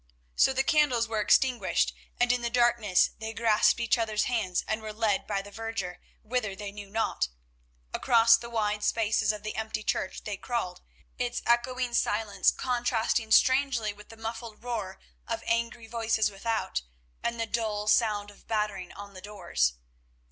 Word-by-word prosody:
So - - +5
the 265 0 +1
candles 270 -7 +3
were 220 -1 -1
extinguished, 250 +3 +3 0.3
and 245 0 +4
in 245 0 +1
the 235 - -1
darkness 235 -5 +3
they 220 0 -5
grasped 225 0 +3
each 235 +1 +2
other's 220 -2 +1
hands 215 -8 0
and 220 0 -1
were 215 0 -5
led 215 -2 0
by 195 - -1
the 205 - -12
verger 220 -4 -5 0.2
whither 220 -3 -2
they 205 0 -6
knew 205 -1 -9
not. 220 - 0 0.7
Across 230 -1 +5
the 235 - -9
wide 210 -2 -1
spaces 215 -1 +2
of 210 -1 -8
the 215 - -4
empty 220 0 -3
church 190 - -2
they 205 -2 -4
crawled, 190 -6 -3 0.4
its 245 -1 -2
echoing 240 +1 +1
silence 210 -3 +2
contrasting 240 -2 0
strangely 260 -3 +3
with 210 0 -15
the 225 - -12
muffled 225 0 -7
roar 215 -6 -4 0.3
of 230 0 -3
angry 235 0 -1
voices 225 -2 0
without 220 - -2 0.4
and 235 0 -2
the 230 - 0
dull 220 -2 -2
sound 210 -2 +2
of 205 - -21
battering 210 -4 -2
on 200 0 -10
the 185 - -10
doors. 185 - 0
225 Hz, 165 wpm, -28 LUFS, 210-235 Hz, 0.7 s, So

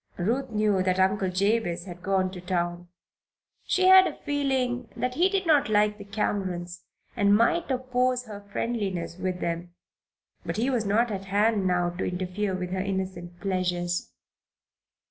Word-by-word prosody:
Ruth 245 +9 -1
knew 210 -3 +1
that 185 0 +1
Uncle 190 0 +2
Jabez 185 -2 0
had 175 -2 -9
gone 190 -1 +1
to 180 -2 -8
town. 175 -1 -2 0.8
She 370 0 +2
had 375 0 +8
a - - -6
feeling 265 -4 0
that 250 0 -1
he 350 +8 +3
did 390 -1 0
not 295 -7 +4
like 210 0 +2
the - - -7
Camerons 185 -4 -3 0.3
and 205 -2 +4
might 330 +10 +2
oppose 255 -1 0
her 205 -2 -8
friendliness 195 -7 -3
with 185 -1 -2
them. 170 +1 -3 0.7
But - - -4
he 245 +5 +1
was 235 -4 0
not 220 +4 +2
at 195 -1 -4
hand 205 0 +2
now 175 -1 +1
to 175 - -4
interfere 185 +2 -2
with 180 -1 -4
her 190 0 -1
innocent 185 -3 -4
pleasures. 180 - -1
200 Hz, 160 wpm, -27 LUFS, 180-235 Hz, 0.8 s, had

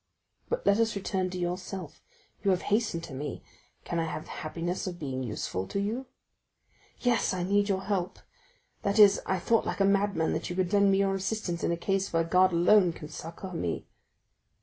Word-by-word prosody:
But 485 +1 -2
let 200 +2 +4
us 225 -2 +2
return 190 -1 -1
to 180 - -5
yourself. 180 -1 -4 0.4
You 200 - +2
have 185 -1 +2
hastened 210 -7 +1
to 150 - -8
me—can 145 +4 -7
I 165 - +1
have 155 -1 -4
the - - -12
happiness 170 +4 -3
of 180 -2 -4
being 135 -5 -4
useful 105 -5 -3
to 200 - -2
you?" 225 +6 -2 0.9
40286m - - -14
"Yes, 240 -5 +2
I 180 - -2
need 200 +2 +2
your 190 -1 0
help: 195 -3 -1 0.6
that 200 +1 0
is 205 -2 +7
I 190 - +1
thought 225 +5 +1
like - - -3
a 195 - +4
madman 195 -4 +2
that - - -3
you 175 - -4
could 185 +1 0
lend 200 -1 +5
me 195 - +3
your 195 0 +2
assistance 195 -3 -2
in - - +1
a 170 - 0
case 195 +2 -1
where 165 0 +2
God 185 +3 +4
alone 175 +1 +5
can 150 -1 -9
succor 165 +4 -8
me." 85 - -3
185 Hz, 200 wpm, -29 LUFS, 170-200 Hz, 0.9 s, is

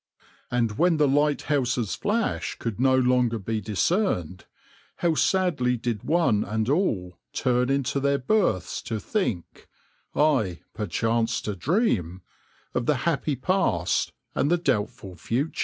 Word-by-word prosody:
And 115 -3 -1
when 170 -1 +4
the 150 -1 +4
lighthouses' 140 -5 +1
flash 220 +2 -1
could 115 -2 -4
no 130 0 +4
longer 125 -2 +2
be 110 +1 -3
discerned, 105 - 0 0.5
how 170 -2 +1
sadly 160 -9 +1
did 115 -3 -3
one 155 -10 +2
and 110 +2 -2
all 110 - 0
turn 125 -1 +1
into 140 0 0
their 140 0 +2
berths 130 - 0
to 110 -2 -2
think 115 - -3 0.5
ay, 130 - +2
'perchance 115 +4 0
to 105 - -4
dream' 95 - 0 0.5
of 120 -1 -1
the 150 - +3
happy 155 -3 0
past 125 - 0 0.2
and 145 - +1
the 175 - +3
doubtful 125 - -2
future. 130 - -2
125 Hz, 130 wpm, -25 LUFS, 105-150 Hz, 0.5 s, when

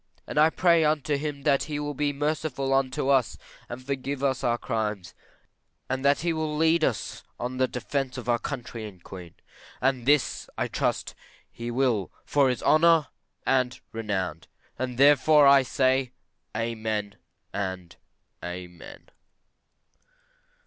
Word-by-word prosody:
And - - -2
I 155 +1 +6
pray 170 -1 +3
unto 150 -1 +1
him 145 -1 -4
that 140 -2 +2
he 150 -1 -4
will 145 0 -3
be 145 +1 0
merciful 145 -2 -1
unto 135 0 0
us, 135 -4 +2 0.3
and 125 +2 -8
forgive 140 0 -3
us 135 -2 0
our 120 0 +2
crimes; 105 -7 -3 0.7
and 130 +1 -2
that 140 0 +3
he 170 0 0
will 155 -1 -2
lead 160 +1 +3
us 125 -7 -1 0.2
on 120 +1 -3
to 130 - -7
the 130 - +3
defence 130 +1 -3
of 125 -2 -7
our 120 -1 +2
country 120 -5 -6
and 95 -4 -14
Queen. 90 -4 -10 0.4
And 130 -2 0
this 145 -1 +2
I - - 0
trust - - -1 0.4
he 120 0 -6
will 120 -6 0
for 140 -2 +3
his 125 -3 -2
honour 165 -1 +4 0.4
and 130 -2 +1
renown; 95 -7 -3 0.4
and 125 -1 -3
therefore 145 +2 +6
I 140 0 +7
say, 130 -1 +1 0.4
Amen, 110 -3 -3 0.4
and 95 -3 -4 0.5
Amen. 90 -1 -9
130 Hz, 145 wpm, -26 LUFS, 115-145 Hz, 0.7 s, I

